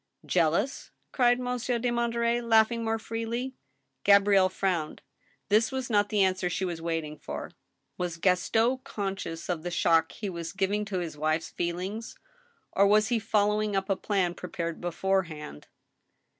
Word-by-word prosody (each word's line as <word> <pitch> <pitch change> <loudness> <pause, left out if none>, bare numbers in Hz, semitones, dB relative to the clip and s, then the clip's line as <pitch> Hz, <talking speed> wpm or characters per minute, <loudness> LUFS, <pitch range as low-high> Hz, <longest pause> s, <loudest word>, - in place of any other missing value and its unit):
" - - -23
Jealous? 170 - +1
" - - -46
cried 245 -1 +3
Monsieur 250 -1 -1
de 240 +1 0
Monterey, 235 0 +1
laughing 230 0 +3
more 225 0 0
freely. 230 +3 -4 0.5
Gabrielle 200 -1 +5
frowned. 180 -5 -2 0.5
This 220 +2 +3
was 260 -2 -3
not 205 -1 +3
the 205 -2 +3
answer 185 -1 +1
she 190 - -1
was 170 -2 -4
waiting 165 -2 -3
for. 70 0 -6 0.5
Was 175 -1 -2
Gaston 225 +8 +2
conscious 195 -5 -4
of 175 -3 -2
the 175 - -4
shock 165 -2 +3
he 210 - -5
was 170 -3 -5
giving 200 +2 0
to 200 -2 -3
his 170 -4 -4
wife's 155 +2 0
feelings, 185 +6 -4 0.5
or 200 +1 +4
was 215 +2 +4
he 240 -2 +2
following 210 -1 +1
up 195 0 0
a - - +3
plan 185 -3 0
prepared 170 -2 -5
beforehand 175 - -2
195 Hz, 155 wpm, -28 LUFS, 175-225 Hz, 0.5 s, Gabrielle